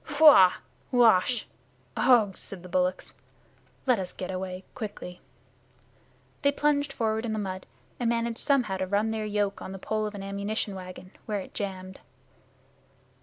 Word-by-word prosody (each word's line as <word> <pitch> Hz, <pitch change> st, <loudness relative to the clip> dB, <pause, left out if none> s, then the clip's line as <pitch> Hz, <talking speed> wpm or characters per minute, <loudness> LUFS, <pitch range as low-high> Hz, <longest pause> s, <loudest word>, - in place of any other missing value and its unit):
"Huah! 285 Hz, -12 st, +8 dB, 0.4 s
Ouach! 235 Hz, -2 st, +4 dB, 0.5 s
Ugh!" 220 Hz, -7 st, +4 dB
said 185 Hz, -3 st, -10 dB
the -, -, -9 dB
bullocks. 180 Hz, +1 st, 0 dB, 0.7 s
"Let 250 Hz, -5 st, +3 dB
us 185 Hz, -1 st, -4 dB
get 185 Hz, -, -5 dB
away 185 Hz, 0 st, -5 dB
quickly." 205 Hz, -6 st, -7 dB, 1.2 s
They 280 Hz, -, +4 dB
plunged 285 Hz, 0 st, +1 dB
forward 220 Hz, -3 st, -1 dB
in 225 Hz, -2 st, -2 dB
the -, -, -2 dB
mud, 190 Hz, -2 st, -4 dB, 0.3 s
and 240 Hz, -2 st, +1 dB
managed 235 Hz, 0 st, -1 dB
somehow 250 Hz, -9 st, +1 dB
to 185 Hz, 0 st, -2 dB
run 205 Hz, +3 st, +1 dB
their 220 Hz, -1 st, -2 dB
yoke 205 Hz, -1 st, -1 dB
on 190 Hz, -, -6 dB
the -, -, -6 dB
pole 215 Hz, +2 st, -2 dB
of 210 Hz, -, -7 dB
an 195 Hz, -, -6 dB
ammunition 200 Hz, +1 st, -2 dB
wagon, 185 Hz, 0 st, -9 dB, 0.2 s
where 210 Hz, -2 st, -1 dB
it -, -, -11 dB
jammed. 190 Hz, -2 st, -5 dB
205 Hz, 155 wpm, -28 LUFS, 185-230 Hz, 1.2 s, Huah